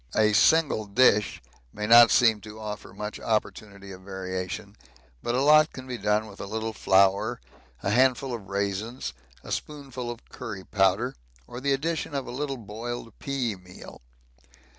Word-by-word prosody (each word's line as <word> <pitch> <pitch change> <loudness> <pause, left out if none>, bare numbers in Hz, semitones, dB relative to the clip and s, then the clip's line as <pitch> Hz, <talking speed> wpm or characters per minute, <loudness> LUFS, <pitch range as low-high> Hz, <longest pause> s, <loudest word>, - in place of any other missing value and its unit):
A 110 -1 +4
single 135 -3 +4
dish 105 -2 +3 0.3
may 105 - -4
not 115 +2 +9
seem 110 -3 +4
to 110 0 -10
offer 105 -2 -7
much 105 +2 -6
opportunity 100 -2 -3
of 95 0 -10
variation, 95 -1 -5 0.5
but 120 - -1
a 130 - +2
lot 155 +1 +6
can 130 - -9
be 125 -2 -5
done 105 +1 +1
with 100 -2 -13
a - - -6
little 110 +2 -3
flour, 100 +5 +3 0.4
a 100 - 0
handful 130 +2 +2
of 110 -5 -7
raisins, 100 +5 -3 0.3
a - - -9
spoonful 135 -5 -5
of 120 0 -8
curry 105 -6 -7
powder, 95 -1 +1 0.3
or 120 +1 -8
the 140 0 +2
addition 155 +1 -2
of 135 - -2
a - - -7
little 135 +1 -3
boiled 115 +1 -7
pea 130 -6 -2
meal. 90 -1 -13
110 Hz, 160 wpm, -26 LUFS, 100-130 Hz, 0.5 s, not